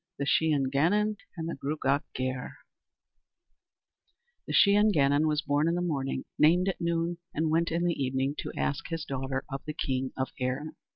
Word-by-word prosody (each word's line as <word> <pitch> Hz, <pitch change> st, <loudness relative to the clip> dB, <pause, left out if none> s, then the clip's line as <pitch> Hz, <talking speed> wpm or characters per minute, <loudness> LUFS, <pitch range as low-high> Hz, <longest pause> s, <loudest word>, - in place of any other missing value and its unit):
The 140 Hz, -, -2 dB
Shee 160 Hz, +3 st, +3 dB
an 135 Hz, -3 st, +1 dB
Gannon 205 Hz, +9 st, +2 dB, 0.2 s
and 165 Hz, 0 st, -3 dB
the 170 Hz, -, -3 dB
Gruagach 140 Hz, 0 st, 0 dB
Gaire 130 Hz, 0 st, -3 dB, 1.9 s
The -, -, -3 dB
Shee 200 Hz, -, +6 dB
an 210 Hz, +1 st, +5 dB
Gannon 145 Hz, -3 st, +3 dB
was 150 Hz, 0 st, 0 dB
born 145 Hz, +1 st, +1 dB
in 170 Hz, -, +1 dB
the 175 Hz, -, -1 dB
morning, 140 Hz, -6 st, -2 dB
named 180 Hz, +5 st, +5 dB
at 190 Hz, -, -4 dB
noon, 170 Hz, 0 st, -1 dB, 0.2 s
and 155 Hz, +1 st, +1 dB
went 165 Hz, +1 st, +2 dB
in 170 Hz, +1 st, 0 dB
the 170 Hz, -4 st, 0 dB
evening 130 Hz, +1 st, 0 dB
to -, -, -4 dB
ask 145 Hz, -, -1 dB
his 165 Hz, -2 st, -4 dB
daughter 135 Hz, 0 st, -3 dB
of 135 Hz, 0 st, -4 dB
the 150 Hz, -1 st, -5 dB
king 130 Hz, -1 st, -1 dB
of 130 Hz, 0 st, -1 dB
Erin. 130 Hz, +4 st, -2 dB
150 Hz, 185 wpm, -29 LUFS, 135-170 Hz, 1.9 s, Shee